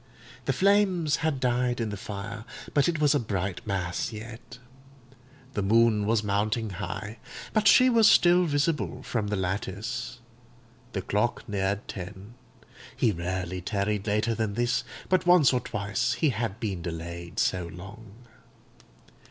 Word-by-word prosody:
The - - +2
flames 190 -6 +3
had 160 -4 -1
died 125 -1 +1
in 115 -2 -1
the - - -3
fire, 105 +2 -6 0.3
but 145 +3 +3
it 165 -3 -1
was 150 -1 +4
a 145 - +2
bright 100 -1 -3
mass 90 -1 -2
yet; 115 +1 -9 1.0
the 105 - -1
moon 110 0 +3
was 110 -1 +2
mounting 105 +2 0
high, 100 +4 -5 0.3
but 215 -1 +3
she 255 +4 +7
was 230 -3 +6
still 175 +1 +5
visible 145 -3 0
from 110 -4 -2
the 105 - -1
lattice; 105 +6 -3 0.8
the 95 - -2
clock 105 +5 -1
neared 100 0 -1
ten; 100 +3 -8 0.6
he 115 - +2
rarely 90 0 -3
tarried 100 +2 -1
later 105 +2 +1
than 110 -3 -2
this, 120 +2 +1 0.2
but 185 -1 +1
once 175 -8 +6
or 125 - +2
twice 105 0 -1
he 145 +4 +2
had 110 -2 -3
been 100 -6 -3
delayed 85 +2 -6
so 90 -5 +1
long. 105 +6 -12
110 Hz, 145 wpm, -27 LUFS, 100-125 Hz, 1.0 s, she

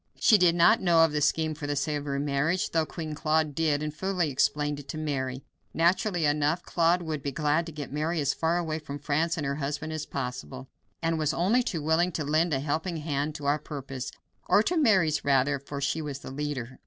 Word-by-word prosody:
She 215 - +6
did 175 -2 +4
not 215 +7 +5
know 170 -3 +5
of 160 - -2
the 150 0 -1
scheme 155 +2 +1
for 150 -1 -6
the 145 - -1
Savoy 145 0 -2
marriage, 145 +5 0
though 160 -1 +1
Queen 155 -3 -6
Claude 155 0 +1
did, 150 -1 +1
and 150 -1 -3
fully 180 -1 -1
explained 145 +2 0
it 145 - -11
to 155 - -5
Mary. 135 -4 -3 0.3
Naturally 175 +1 +2
enough, 150 +3 +1
Claude 175 +1 +2
would 155 -3 -3
be 140 - -3
glad 150 +4 0
to - - -6
get 145 -2 -7
Mary 155 +3 -1
as 140 -2 +1
far 165 +1 0
away 160 -2 -2
from 145 -2 -7
France 155 +4 0
and 150 - -2
her 140 +1 -2
husband 150 +2 -3
as 155 -1 -4
possible, 130 0 -5 0.4
and 165 0 0
was 155 0 0
only 205 +9 +3
too 165 -10 -3
willing 165 +3 +2
to 155 - -2
lend 155 +4 +1
a 135 - +1
helping 160 +4 -2
hand 150 -1 -2
to 145 - -7
our 145 +2 +2
purpose, 135 -3 -6 0.4
or 210 - +5
Mary's, 190 - +3
rather, 140 0 +2
for 140 +1 -7
she 140 +3 -1
was 145 -3 -5
the 135 - -9
leader. 135 -3 -4
150 Hz, 215 wpm, -27 LUFS, 145-165 Hz, 0.4 s, She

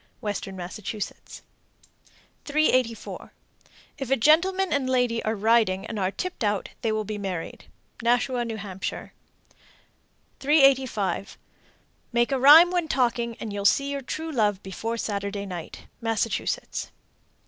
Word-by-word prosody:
Western 205 -3 -4
Massachusetts. 190 +3 -7 1.0
384. 255 -6 0 0.7
If 270 -3 -4
a 270 - +4
gentleman 345 +8 +3
and 270 -2 0
lady 245 -3 +1
are 220 +1 0
riding 215 -3 +2
and 220 - -5
are 185 -1 +1
tipped 355 - -5
out, 205 -2 0
they 225 -3 0
will 215 0 -1
be 210 0 -5
married. 185 -4 -5 0.4
Nashua, 245 +1 +1
N.H. 205 -5 -4 1.4
385. 265 - +2 0.7
Make 240 +2 +2
a 270 - +1
rhyme 310 +7 +9
when 350 -3 0
talking, 235 -4 0
and 215 -2 -5
you'll 200 0 -3
see 275 +7 +3
your 280 -1 -3
true 320 +5 -5
love 210 -7 +1
before 225 +5 -4
Saturday 200 -2 -3
night. 175 -4 -7 0.2
_Massachusetts. 225 - -2
230 Hz, 125 wpm, -25 LUFS, 205-270 Hz, 1.4 s, rhyme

